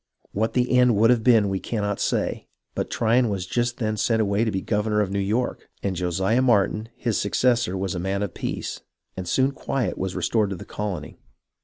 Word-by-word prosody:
What 110 +3 -1
the 125 0 +2
end 125 -2 +5
would 115 +4 +5
have 120 -3 +2
been 115 -4 +5
we 95 -1 -1
cannot 105 -2 -2
say, - - -1 0.3
but - - -3
Tryon 115 +1 +2
was 95 -3 -2
just 120 +5 -1
then 110 -3 -1
sent 110 +2 +1
away 100 0 +2
to 115 - +1
be 95 -3 -1
governor 105 +1 0
of 100 -2 0
New 100 - -1
York, 110 +6 -1
and 95 -2 -1
Josiah 95 +7 +1
Martin, 110 -2 +2
his 115 -3 -1
successor, 115 -2 +1
was 95 -1 -2
a 90 - -3
man 95 +3 -1
of 100 - -4
peace, - - -4 0.3
and 95 -1 -5
soon 130 +9 +2
quiet 135 -2 -2
was 95 0 -3
restored 100 +3 +1
in 95 - -3
the - - -9
colony. 105 -3 -5
105 Hz, 205 wpm, -24 LUFS, 95-120 Hz, 0.3 s, end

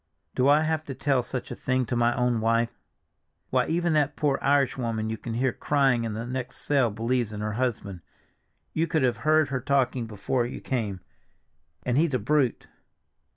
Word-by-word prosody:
Do 130 +1 +2
I 150 +2 +6
have 160 0 0
to 135 - -6
tell 135 -2 +1
such 125 +1 -6
a - - -4
thing 130 -1 0
to 120 - -2
my 120 0 +2
own 125 -2 +1
wife? 115 +1 +2 0.8
Why, - - +2
even 170 0 +1
that 150 -1 +2
poor 145 -2 +1
Irish 140 -2 +2
woman 115 -3 -2
you 110 - -3
can 115 -2 -5
hear 125 +1 +1
crying 135 -5 +2
in 110 - -3
the 110 +2 -4
next 125 0 -5
cell 135 -5 +2
believes 115 +1 -1
in 105 0 -6
her 105 0 -2
husband; 110 -7 -2 0.7
you 165 +1 +1
should 160 -5 +2
have 120 -2 +2
heard 155 +2 +3
her 130 -1 -2
talking 130 -3 +1
before 115 +4 -1
you - - -7
came—and 95 - -6
he's 160 -4 +2
a - - +1
brute." 130 +2 +1
125 Hz, 190 wpm, -26 LUFS, 115-140 Hz, 0.8 s, I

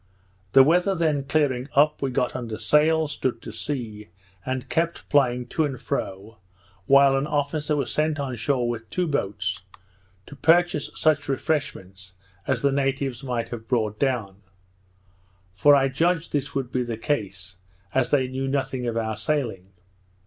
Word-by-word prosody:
The 135 - +9
weather 180 +6 +3
then 155 -5 0
clearing 135 -3 0
up, 150 +2 +4
we 135 - 0
got 125 -1 -1
under 115 -4 -4
sail, 155 +1 +3
stood 130 -5 -2
to - - -7
sea, 110 -4 -5 0.3
and 130 +1 -3
kept 170 +1 -1
plying 125 -4 +2
to 160 - 0
and 135 -4 -3
fro, 105 +3 -5 0.5
while 140 0 +6
an 135 +2 0
officer 150 +1 -1
was 135 -5 -2
sent 155 0 0
on 135 -3 -3
shore 125 +1 0
with 115 -1 -4
two 180 - -1
boats, 100 - -2 0.6
to 145 - -11
purchase 165 +1 +3
such 155 -2 +1
refreshments 95 -11 -3 0.3
as - - 0
the 140 - +3
natives 135 -1 -1
might 125 -3 -2
have 115 -2 -7
brought 110 -4 0
down; 120 -8 -1 1.1
for 145 +11 +5
I 135 -1 +3
judged 165 +5 0
this 145 -2 -2
would 130 -3 -2
be 130 - 0
the 120 -2 -3
case, 95 -7 -3 0.4
as 130 -2 +1
they 135 -3 +2
knew 130 +1 -3
nothing 135 -2 -2
of 115 -1 -2
our 110 -1 -1
sailing. 110 -5 -2
135 Hz, 160 wpm, -24 LUFS, 115-145 Hz, 1.1 s, The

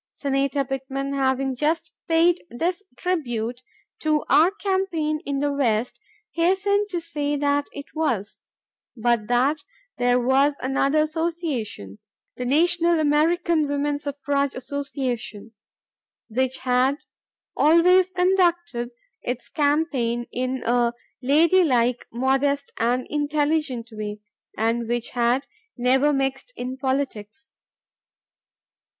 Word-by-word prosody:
Senator 275 0 0
Pittman, 270 +1 -4
having 265 -1 0
just 315 +4 -1 0.2
paid 335 +1 +3
this 345 +10 -2 0.2
tribute 245 -9 -2 0.4
to 305 -1 +1
our 325 +4 +6
campaign 375 -6 -1
in 280 -1 -1
the 290 0 0
West, 245 -4 0 0.3
hastened 400 +4 +1
to 355 -3 -2
say 295 -3 -1
that 285 0 +1
it 285 -1 -8
was, 245 -11 -2 0.6
but 230 -2 +1
that 255 +5 +2 0.4
there 245 0 +3
was 270 +3 +3
another 275 +3 +2
association, 310 - -3 0.4
the 250 - -4
National 340 +4 +3
American 310 +1 +2
Woman 285 0 -1
Suffrage 280 -1 -1
Association, 255 -5 -4 0.8
which 260 +3 0
had 255 +2 +2 0.6
always 360 +4 +5
conducted 350 -8 +1 0.3
its 245 0 -4
campaign 285 -6 0
in 255 +1 -2
a 240 0 +2 0.3
"lady 320 +8 +4
like—modest—and 255 0 0
intelligent 295 -4 -1
way" 210 -1 -5 0.4
and 230 +2 0
which 240 0 -2
had 245 +2 +1 0.3
"never 260 +4 +3
mixed 270 - -2
in 255 +1 -4
politics." 265 -2 -3
280 Hz, 105 wpm, -24 LUFS, 245-315 Hz, 0.8 s, our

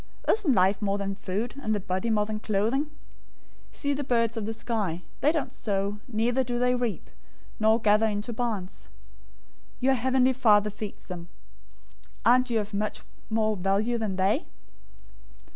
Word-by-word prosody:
Isn't 395 -11 +3
life 190 0 +3
more 200 -1 0
than 200 -1 -2
food, 205 +4 -3
and 215 -4 0
the - - -1
body 190 +3 -2
more 210 -2 +2
than 215 0 -4
clothing? 220 +7 +1
006:026 - - -19 0.8
See 285 -1 0
the 285 +1 -2
birds 230 -3 +1
of 220 -2 -3
the 225 - -2
sky, 205 -8 -2 0.2
that - - 0
they - - +7
don't 315 -3 -2
sow, 200 0 -2
neither 240 +3 +1
do 240 -1 -2
they 250 +1 +2
reap, 240 -7 -2 0.5
nor 220 +1 +4
gather 215 0 +4
into 210 +2 -3
barns. 215 -5 -4 0.9
Your 265 +1 +3
heavenly 260 +1 +3
Father 210 -5 +4
feeds 210 0 -7
them. 175 -2 -7 1.0
Aren't 255 +2 +5
you 230 -2 +2
of 210 0 -5
much 210 +1 -2 0.3
more 220 -1 +1
value 200 +5 +1
than 210 -4 -2
they? 190 +3 +1
220 Hz, 165 wpm, -27 LUFS, 205-245 Hz, 1.0 s, they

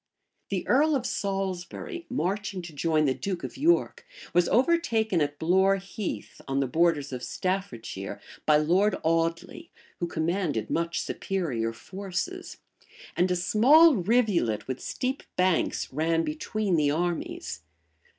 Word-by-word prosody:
The 195 -2 -2
earl 295 +4 +4
of 255 -3 -1
Salisbury, 195 - -3
marching 200 -5 -2
to 170 -2 -9
join 155 +1 +1
the 135 - +2
duke 185 +4 -4
of - - -6
York, 325 +6 +2 0.3
was 175 0 +3
overtaken 230 - +2
at 145 0 -1
Blore 190 +5 +3
Heath, 195 - -6
on 135 0 0
the 140 - +2
borders 150 0 +1
of 125 - -4
Staffordshire, 125 - -4 0.3
by 150 -1 +6
Lord 185 +7 +3
Audley, 165 +1 -1 0.3
who 175 - -1
commanded 160 - -1
much 170 0 0
superior 135 -13 -2
forces; 185 +11 -5 0.6
and 180 +1 +2
a 180 - +2
small 255 - +6
rivulet 185 - +1
with 130 -1 -3
steep 260 +1 -3
banks 180 -6 +1
ran 165 +3 +1
between 215 - -1
the 150 -2 +3
armies. 175 - -2
180 Hz, 130 wpm, -27 LUFS, 155-210 Hz, 0.6 s, by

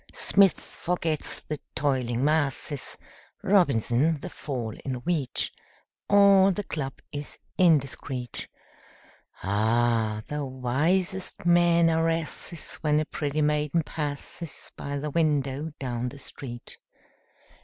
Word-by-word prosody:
Smith 195 -2 +4
forgets 165 -3 -3
the 150 -2 -5 0.2
"toiling 130 -2 +1
masses," 145 -2 0 0.5
Robinson, 155 - +3
the - - -7
fall 120 -6 -4
in 130 -2 -2
wheat; 145 +1 -1 0.6
All 200 -1 +7
the 205 +2 -2
club 135 -7 -5
is 145 0 -6 0.2
indiscret. 135 - +1 1.0
Ah, 110 +2 +1
the 150 0 -3
wisest 155 +10 0
men 175 -1 +5
are 165 0 +2
asses 165 +1 -2
When 150 -1 +3
a 155 - 0
pretty 150 0 -1
maiden 150 +2 +1
passes 150 +2 -5
By 140 0 -4
the 150 +1 -3
window 145 -2 +1
down 125 -2 -2
the 140 - -11
street! 120 -3 -9
145 Hz, 110 wpm, -27 LUFS, 130-165 Hz, 1.0 s, All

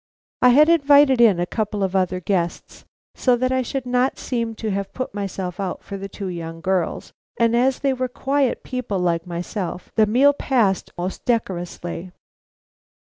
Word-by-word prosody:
I 250 - +7
had 295 +5 +6
invited 285 -5 +5
in 210 -7 +5
a 175 - +1
couple 210 +1 -2
of 190 0 -1
other 185 -1 +1
guests 175 -2 -3 0.3
so 250 -2 +2
that 255 +1 0
I 260 0 +2
should 260 +1 -4
not 250 +1 +1
seem 230 -3 -3
to 215 -1 -3
have 195 0 -4
put 255 - -4
myself 195 -3 -4
out 190 -2 -4
for 195 0 -6
two 195 0 -7
young 165 -2 -6
girls, 180 -1 -2 0.3
and 230 0 +3
as 255 +2 +2
they 275 -1 0
were 255 0 -2
quiet 270 +1 -1
people 250 -6 -3
like 170 -2 0
myself, 180 +1 -5
the 220 -1 +3
meal 265 +7 +5
passed 230 -9 0
most 180 +2 -4
decorously. 180 -5 -3
215 Hz, 170 wpm, -22 LUFS, 185-255 Hz, 0.3 s, I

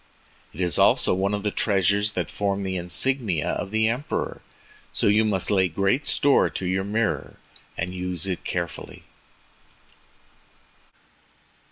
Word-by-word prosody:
It 90 - -7
is 90 -1 0
also - - +4
one 100 +2 0
of 100 - -5
the 105 - 0
treasures 100 +1 +1
that 90 -4 -3
form 100 -1 -1
the 95 -1 -3
insignia 90 - 0
of - - -3
the 110 +1 +1
Emperor. 125 +6 -3 0.5
So - - -1
you 105 +2 +4
must 105 -2 0
lay 95 -2 +3
great 100 - 0
store 140 -1 +4
by 95 - -5
your 95 +1 0
mirror, 110 +2 -2 0.4
and 90 - -3
use 90 -1 -3
it 95 -2 -3
carefully." 85 -2 -5
100 Hz, 140 wpm, -24 LUFS, 90-105 Hz, 0.5 s, also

